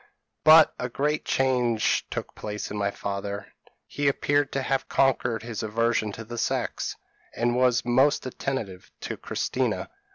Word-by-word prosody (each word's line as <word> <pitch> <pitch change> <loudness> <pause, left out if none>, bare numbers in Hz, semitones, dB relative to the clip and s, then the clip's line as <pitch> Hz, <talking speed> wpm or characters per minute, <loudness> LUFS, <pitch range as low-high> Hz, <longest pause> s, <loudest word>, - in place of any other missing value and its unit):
But 155 0 +8
a 125 - -2
great 150 +5 -1
change 125 -4 +1
took - - -5
place 105 0 -5
in 105 - -4
my 100 -1 +1
father; 100 0 -5 0.3
he 145 0 -2
appeared 145 0 +1
to 135 - -1
have 135 0 -1
conquered 120 -4 +1
his 115 -2 -5
aversion 110 0 0
to 110 - -7
the 120 +1 -6
sex, - - -1 0.4
and 120 +1 +1
was 125 -2 +3
most 130 +5 +3
attentive 120 -8 -4
to - - -4
Christina. - - -2
120 Hz, 150 wpm, -26 LUFS, 110-135 Hz, 0.4 s, But